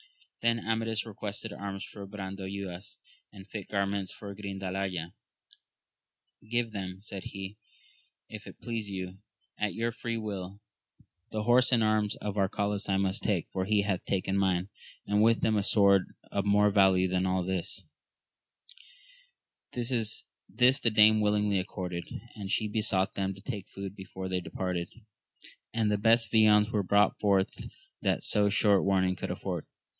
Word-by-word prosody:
Then 115 0 +1
Amadis 115 0 0
requested 105 0 -5
arms 100 -1 -5
for 100 -2 -9
Brandoyuas, 95 -1 -6 0.3
and 95 -1 -12
fit 105 -2 -6
garments 100 -1 -1
for 100 -1 -8
Grindalaya; 95 -3 -4 1.4
Give 120 -1 +1
them, 95 -3 -5
said 100 -2 -7
he, 100 +1 -6 0.7
if 110 -1 -9
it - - -11
please 115 -3 -4
you, 95 -1 -5 0.4
at 105 -1 -1
your 115 +1 0
free 115 0 -3
will: 100 -3 -5 0.7
the 110 -1 -2
horse 120 +3 +4
and 115 -3 +4
arms 110 -1 +2
of 105 -1 -4
Arcalaus 100 +1 0
I 95 - +3
must 95 -1 0
take, 95 -6 0
for 95 -1 -1
he 105 0 +3
hath 100 -3 -1
taken 95 0 0
mine, 95 -1 +1 0.4
and 105 +1 +2
with 115 +1 +4
them 110 -1 +2
a 105 - +3
sword 100 -2 +4 0.2
of 100 -1 0
more 105 0 +4
value 95 -2 +5
than 95 0 +1
all 95 0 +1
this! 95 -1 -3 1.9
This 125 +2 0
the 120 - +2
dame 110 0 +6
willingly 105 -1 +2
accorded, 90 -2 -4 0.3
and 100 -3 -5
she 110 -1 +1
besought 105 -3 0
them 95 -1 -2
to 95 - -13
take 105 -6 -5
food 100 0 -7
before 95 -1 -7
they 95 -1 -1
departed, 90 -1 -3 0.8
and 110 -2 +1
the 105 - +1
best 115 +2 +4
viands 105 -1 +5
were 105 - +2
brought 100 +2 +3
forth 100 -2 +3 0.5
that - - +1
so 105 -1 +2
short 100 -1 +4
warning 95 -1 +2
could - - -5
afford. - - -4
100 Hz, 150 wpm, -30 LUFS, 95-110 Hz, 1.9 s, dame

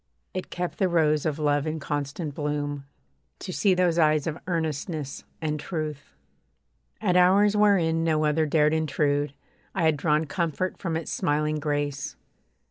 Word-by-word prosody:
It 185 - -4
kept 180 0 -4
the 190 -2 +3
rose 155 -3 +2
of 155 -1 -1
love 145 -1 +1
in 155 +1 -2
constant 145 +1 -3
bloom 145 -1 -3 0.5
To 185 - -6
see 195 0 +3
those 175 -2 +2
eyes 155 -2 +3
of 160 0 -3
earnestness 155 -3 -3 0.2
and 150 -1 -1
truth. 155 -3 -5 0.8
At 190 -4 +1
hours 195 +3 +5
wherein 180 -6 +3
no 155 -2 +2
other 155 +1 +2
dared 150 0 +3
intrude, 145 -2 0 0.4
I 180 - 0
had 160 -2 +3
drawn 150 +1 +2
comfort 170 +3 -2
from 165 -4 -2
its 165 - -5
smiling 150 +1 0
grace. 145 -2 -2
155 Hz, 150 wpm, -26 LUFS, 145-170 Hz, 0.8 s, hours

